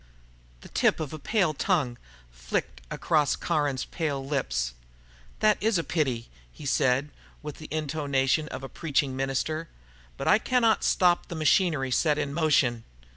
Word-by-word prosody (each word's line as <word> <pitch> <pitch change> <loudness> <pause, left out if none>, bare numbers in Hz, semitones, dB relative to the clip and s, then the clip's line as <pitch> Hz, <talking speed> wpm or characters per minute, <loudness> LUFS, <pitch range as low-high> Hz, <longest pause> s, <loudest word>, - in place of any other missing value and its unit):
The - - -13
tip - - +2
of 155 -2 -4
a 155 - -6
pale 190 -2 +1
tongue 140 -7 0 0.3
flicked - - -4
across 150 -4 +1
Caron's 145 -4 -1
pale 145 -5 -3
lips. 60 - -1 0.7
"That 215 -1 +3
is 215 -1 +2
a 165 - 0
pity," 135 -8 -1 0.2
he 145 - -12
said, 130 +1 +2 0.3
with 150 -1 -7
the 155 - -9
intonation 150 -1 0
of 135 - -7
a - - -4
preaching 140 -3 -1
minister. 135 +5 -2 0.5
"But - - -4
I 215 - +6
cannot 235 -2 +2
stop 175 -1 +3
the 170 - -6
machinery 155 -4 +2
set 150 +3 +2
in 145 -2 -2
motion...." 140 -7 +2
150 Hz, 150 wpm, -27 LUFS, 135-165 Hz, 0.7 s, I